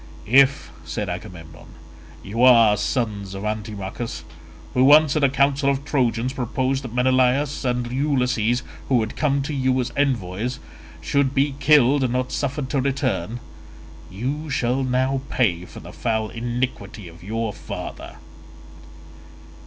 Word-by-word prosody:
"If," 135 +5 +4
said 105 -4 -4
Agamemnon, 90 -4 -9 0.5
"you 110 +5 -3
are 115 -4 +7
sons 105 -3 -2
of 100 +2 -6
Antimachus, 105 -4 -5 0.5
who 125 - +3
once 150 +2 +6
at 155 - +1
a 140 - +5
council 140 +1 +2
of 140 0 -1
Trojans 125 -3 0
proposed 130 +2 -1
that 125 - -7
Menelaus 130 +3 +2
and 125 -1 -1
Ulysses, 125 -4 0 0.3
who 125 -4 +3
had 110 - -4
come 140 -2 +1
to 150 - -4
you 130 -1 +1
as 125 - -2
envoys, 120 -4 -1 0.4
should 135 - 0
be 140 +1 +2
killed 140 -1 +4
and 125 -2 0
not 125 0 -1
suffered 140 -1 -2
to 140 - +1
return, 130 - -2 0.7
you 135 +11 -4
shall 130 -1 0
now 130 +1 0
pay 90 -8 0
for - - -11
the - - -11
foul 110 -1 -1
iniquity 120 -4 -4
of 85 0 -14
your 110 +2 -3
father." - - -8
125 Hz, 140 wpm, -22 LUFS, 110-135 Hz, 0.7 s, are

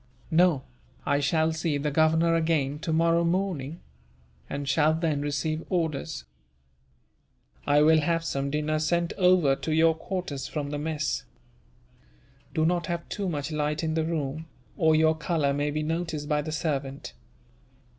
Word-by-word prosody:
"No; 165 -4 +4 0.4
I 140 - +2
shall 160 +2 +1
see 160 -2 -1
the 145 +1 -1
Governor 160 +2 +3
again, 160 -4 +1
tomorrow 165 +1 +2
morning; 170 -4 -1 0.7
and 140 0 -4
shall 155 +3 +3
then 160 -3 0
receive 145 +2 -2
orders." 160 - -2 1.4
"I 145 +1 +5
will 160 +1 +6
have 165 +2 0
some 140 -3 -2
dinner 150 +1 0
sent 170 +2 0
over 180 -7 +4
to 160 - -4
your 160 +1 +4
quarters, 160 -6 -4
from 145 -1 -4
the 145 - -3
mess. 155 -1 -2 1.3
Do 155 -1 +2
not 175 0 +1
have 170 -1 -3
too 200 -3 -2
much 150 -1 -3
light 150 +1 -1
in 160 -1 0
the 160 0 +1
room, 155 -1 -3 0.3
or 160 -1 +3
your 160 0 +4
colour 155 -3 0
may 145 +1 0
be 155 +1 -2
noticed 160 -2 -3
by 150 0 +1
the 155 +1 -5
servant. 140 -4 -3
155 Hz, 150 wpm, -27 LUFS, 145-165 Hz, 1.4 s, will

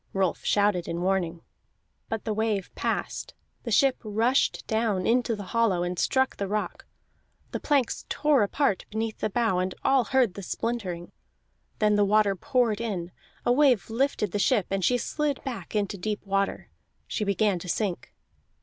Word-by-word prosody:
Rolf 190 -3 0
shouted 200 -4 +2
in 170 +1 -3
warning. 180 -3 0 0.7
But 225 -1 -3
the 220 - 0
wave 215 -3 -1
passed, - - -3 0.3
the 240 - -6
ship 265 +4 +4
rushed 225 +5 +1
down 220 -4 0
into 235 -1 +2
the 205 - -7
hollow, 220 -7 +2
and 175 0 -3
struck 265 0 +2
the 200 - -2
rock. 210 +2 -3 0.6
The - - -3
planks 280 -5 0
tore 295 -4 +3
apart 205 0 +1
beneath 220 0 -3
the 215 - 0
bow, 220 -3 +1
and 185 0 -2
all 270 -3 +4
heard 255 -7 +2
the 200 - -7
splintering; 185 -4 -3 0.7
then 210 -1 +3
the 205 - +4
water 205 0 +3
poured 240 -1 +1
in, 185 -7 -3 0.3
a - - +3
wave 250 -5 +3
lifted 230 -5 0
the 205 - -1
ship, 210 -2 +3
and 195 -1 0
she 250 +7 +3
slid 295 +3 -1
back 230 - -6
into 200 -1 -1
deep 210 +3 -3
water. 195 0 -1 0.3
She 215 - -2
began 200 -1 +1
to 180 - -8
sink. 185 - -2
210 Hz, 170 wpm, -27 LUFS, 195-240 Hz, 0.7 s, ship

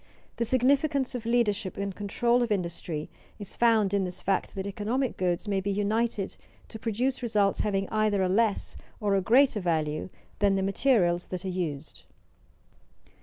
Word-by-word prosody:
The 235 - 0
significance 270 +3 +2
of 235 -2 -5
leadership 220 -5 +1
and 200 -1 -3
control 235 +5 +1
of 235 -2 -1
industry 170 -5 -2 0.3
is 205 -3 -7
found 220 -4 +3
in 200 -1 +2
this 180 -1 -4
fact 195 +2 -1
that 190 -1 -4
economic 220 +6 -1
goods 180 +2 -1
may 195 -2 0
be 200 - -3
united 205 0 -1 0.3
to 220 - -8
produce 245 +5 -1
results 210 -4 +1
having 195 -2 0
either 215 -3 +2
a - - +2
less 210 +2 +1 0.2
or 205 -2 +1
a 195 - +3
greater 250 +3 +4
value 160 -3 -1 0.3
than 200 -1 +3
the 195 - 0
materials 195 -4 +2
that 185 +1 -5
are - - -1
used. 160 -5 -5
205 Hz, 165 wpm, -28 LUFS, 190-230 Hz, 0.3 s, greater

